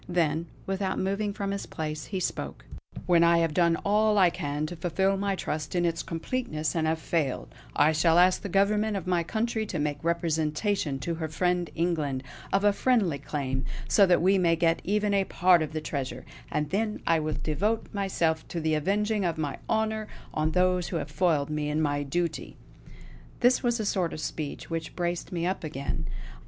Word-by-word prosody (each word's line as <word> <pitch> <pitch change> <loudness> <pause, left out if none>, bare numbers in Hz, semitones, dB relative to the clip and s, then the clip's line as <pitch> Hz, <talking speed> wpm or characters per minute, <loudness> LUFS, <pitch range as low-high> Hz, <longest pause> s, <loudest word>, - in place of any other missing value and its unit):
Then, 165 -2 +1 0.2
without 195 0 -1
moving 200 +2 -1
from 200 -1 -3
his 200 0 -4
place, 155 -1 -4
he 190 - -3
spoke: 180 - -4 0.4
"When 170 -1 +5
I 170 0 +5
have 165 -2 +1
done 170 0 +3
all 210 +1 +3
I 185 -3 +6
can 145 0 -2
to 175 - -6
fulfill 190 +4 +1
my 195 0 0
trust 155 -2 -4
in 175 -1 +2
its 165 -1 0
completeness, 165 -3 -3
and 160 -1 +1
have 160 +1 +1
failed, 160 -4 -2 0.2
I 150 +2 +5
shall 165 +2 +3
ask 180 +1 +5
the 200 - -5
government 210 +2 +2
of 190 - -5
my 180 -1 +2
country 220 +5 -1
to 175 - -3
make 145 -1 -2
representation 165 0 0
to 170 - -2
her 160 - -1
friend 175 +2 0
England 155 -6 -1 0.3
of 195 +1 +2
a 205 -1 +5
friendly 200 - +2
claim, 135 -2 -3 0.2
so 200 -2 +5
that 175 -2 +4
we 190 +1 +4
may 170 -2 +3
get 165 0 +2
even 210 +1 +1
a 195 -1 +3
part 180 -2 +4
of 155 -1 -2
the 155 0 -3
treasure; 140 -4 -4 0.3
and 150 -1 -1
then 210 +2 -1
I 165 -1 +3
will 155 0 -2
devote 205 +9 0
myself 170 -5 0
to 170 - -4
the 160 -1 0
avenging 205 +6 +1
of 170 -3 0
my 150 -3 -3
honour 220 -1 0 0.3
on 155 0 +1
those 180 0 +2
who - - -4
have 150 -2 -5
foiled 155 -3 +1
me 150 -1 -1
in 150 +1 0
my 145 -2 +1
duty!" 160 +3 -3 0.8
This 245 +1 +4
was 240 -1 +1
a 215 - -1
sort 185 -4 0
of - - -6
speech 150 -1 -5
which 165 -1 -4
braced 175 -1 -2
me 170 -2 -2
up 185 0 -1
again. 140 -3 -4
170 Hz, 195 wpm, -28 LUFS, 155-195 Hz, 0.8 s, I